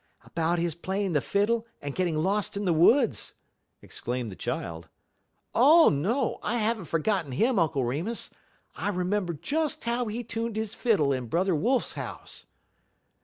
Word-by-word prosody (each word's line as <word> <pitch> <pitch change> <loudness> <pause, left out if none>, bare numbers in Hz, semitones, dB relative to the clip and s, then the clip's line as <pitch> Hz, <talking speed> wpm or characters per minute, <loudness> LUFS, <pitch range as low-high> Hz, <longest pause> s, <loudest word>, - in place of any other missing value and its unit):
"About 165 +1 -1
his 170 -1 0
playing 190 +3 -2
the 145 - +2
fiddle 220 +6 0
and 145 -1 -5
getting 175 -2 0
lost 200 +5 0
in 205 - -2
the 175 - +3
woods!" 225 - +3 0.5
exclaimed 120 -2 -4
the - - -8
child. 80 -2 -5 0.6
"Oh, 310 +7 +7
no, 215 - 0
I 240 - -1
have 225 0 +1
n't 170 - -9
forgotten 165 -3 0
him, 230 - +2
Uncle 145 -6 +1
Remus. 165 - -3 0.4
I - - -2
remember 185 -1 -1
just 310 - -2
how 235 +1 -1
he 225 +3 -3
tuned 230 0 -3
his 220 -1 -3
fiddle 190 - +2
in 130 -2 -3
Brother 180 - +1
Wolf's 240 - +1
house." - - -8
195 Hz, 160 wpm, -27 LUFS, 160-230 Hz, 0.6 s, Oh